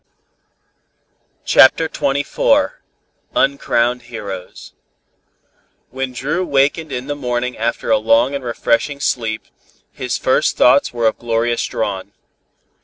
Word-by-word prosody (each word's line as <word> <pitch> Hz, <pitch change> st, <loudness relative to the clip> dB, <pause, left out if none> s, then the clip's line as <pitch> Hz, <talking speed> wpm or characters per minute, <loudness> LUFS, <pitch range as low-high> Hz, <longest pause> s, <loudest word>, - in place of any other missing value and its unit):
CHAPTER 160 Hz, +5 st, +5 dB
XXIV 145 Hz, -, +1 dB, 0.6 s
UNCROWNED 125 Hz, -3 st, +1 dB
HEROES 100 Hz, -6 st, -8 dB, 1.2 s
When 130 Hz, +1 st, -3 dB
Dru 150 Hz, +8 st, -2 dB
wakened 145 Hz, 0 st, +1 dB
in 125 Hz, -1 st, -4 dB
the 145 Hz, -, -3 dB
morning 125 Hz, -2 st, -2 dB
after 115 Hz, 0 st, -2 dB
a 110 Hz, -, +4 dB
long 115 Hz, +5 st, +3 dB
and 140 Hz, -1 st, -4 dB
refreshing 120 Hz, +4 st, 0 dB
sleep, 115 Hz, -5 st, -2 dB, 0.5 s
his -, -, -3 dB
first -, -, +1 dB
thoughts -, -, +4 dB
were 120 Hz, -1 st, -2 dB
of 110 Hz, -, +1 dB
Gloria 120 Hz, 0 st, 0 dB
Strawn. 100 Hz, -3 st, -3 dB
125 Hz, 110 wpm, -18 LUFS, 115-140 Hz, 1.2 s, CHAPTER